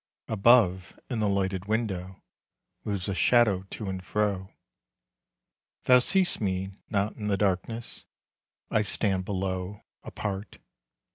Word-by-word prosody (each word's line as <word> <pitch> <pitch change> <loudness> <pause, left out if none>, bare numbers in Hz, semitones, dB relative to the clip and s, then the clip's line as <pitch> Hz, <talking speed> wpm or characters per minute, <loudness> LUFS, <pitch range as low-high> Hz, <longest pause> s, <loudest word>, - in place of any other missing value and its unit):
Above, 100 -4 +3
in 120 - -1
the 105 -1 +2
lighted 95 -1 -1
window, 100 -4 -2 0.6
Moves 100 -4 -3
a 100 - -1
shadow 110 -2 +4
to 105 - -6
and 95 -1 -4
fro. 100 -1 -1 1.3
Thou 125 0 +7
see'st 185 +5 +2
me 95 -1 -1 0.2
not 100 +1 0
in 105 - -4
the 100 -1 +1
darkness, 105 +4 -2 0.7
I 110 - +3
stand 95 -3 0
below, 95 0 -3 0.2
apart. 100 0 -5
100 Hz, 120 wpm, -28 LUFS, 95-110 Hz, 1.3 s, Thou